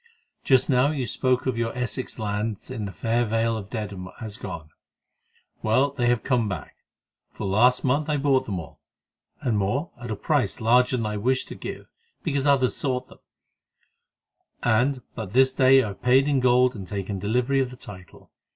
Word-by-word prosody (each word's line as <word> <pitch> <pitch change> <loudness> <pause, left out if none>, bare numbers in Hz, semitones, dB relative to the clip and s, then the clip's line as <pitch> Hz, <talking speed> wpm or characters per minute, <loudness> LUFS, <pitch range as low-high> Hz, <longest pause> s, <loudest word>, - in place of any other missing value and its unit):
Just 130 -2 +4
now 130 +1 +3
you 140 -4 -2
spoke 125 +3 0
of 130 -3 -1
your 115 +1 -2
Essex 125 +1 -3
lands 105 -1 -3
in 105 - -4
the 100 - -5
fair 115 +3 0
Vale 115 0 0
of 100 -3 -6
Dedham 100 -5 -5
as 110 -2 -6
gone. 85 -8 -8 0.9
Well, 130 +6 +2
they 125 -4 -1
have 120 -2 +2
come 120 -5 +1
back, 85 -7 -6 0.5
for - - -7
last 115 +6 +3
month 145 +4 +1
I 150 - +1
bought 135 -2 +2
them 95 -4 -2
all, 80 - -11 0.6
and 110 -5 0
more, 125 - -1
at 120 - -6
a 110 - -2
price 125 -1 0
larger 125 +3 +3
than 115 - -2
I 105 0 -2
wished 130 +5 0
to - - -7
give - - -7 0.4
because 140 0 0
others 135 -3 +3
sought 130 -2 -2
them, - - -16 1.4
and 125 +3 +2
but 110 -4 -6
this 130 +1 +4
day 130 0 +5
I 110 - -3
have 100 - -10
paid 130 +3 +4
in 140 -2 +2
gold 125 0 +4
and 95 -3 -7
taken 100 0 -4
delivery 125 +7 +1
of 130 -2 0
the 125 - -11
title. 90 -6 -13
120 Hz, 190 wpm, -25 LUFS, 105-130 Hz, 1.4 s, day